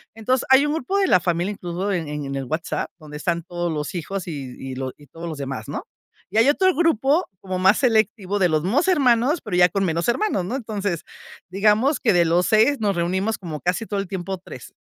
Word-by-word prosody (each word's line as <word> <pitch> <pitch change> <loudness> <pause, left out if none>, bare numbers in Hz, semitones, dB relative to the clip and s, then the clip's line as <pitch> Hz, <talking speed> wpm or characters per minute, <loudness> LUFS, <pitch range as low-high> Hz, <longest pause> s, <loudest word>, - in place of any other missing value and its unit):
Entonces 250 +3 0
hay 265 +2 +6
un 295 - 0
grupo 355 +7 -1
de 385 - +3
la 180 - +5
familia, 175 +3 -1
incluso, 185 +2 -3
en 170 -5 -2
en 145 -2 -4
el 135 -1 -3
WhatsApp, 160 +5 -3
donde 150 -1 -9
están 170 +2 -1
todos 175 -1 -3
los 150 +4 -4
hijos, 185 +2 -4
y 135 -6 -6
y 135 -1 -6
los 130 0 -4 0.2
todos 165 +1 -7
los 155 -3 -5
demás, 135 -5 -5
¿no? - - -5 0.4
Y 210 - -3
hay 230 +5 +5
otro 375 +5 +3
grupo 315 - +2
como 185 -1 -3
más 190 +3 +4
selectivo 215 -5 +1
de 180 -2 +3
los 155 0 +1
mismos 275 - +1
hermanos, 275 -2 +3
pero 205 -6 -3
ya 180 0 +6
con 195 +3 -1
menos 170 +3 -1
hermanos, 240 - 0
¿no? 235 +8 -3
Entonces 205 - -3 0.5
digamos 215 - +2
que 220 -5 +2
de 170 -1 +4
los 170 +2 +2
6 225 +5 +4
nos 200 -3 0
reunimos 190 +6 0
como 160 -5 -6
casi 180 +6 -1
todo 200 -1 -2
el 195 - -3
tiempo 190 0 -4
3. - - -11
190 Hz, 220 wpm, -22 LUFS, 170-230 Hz, 0.5 s, hay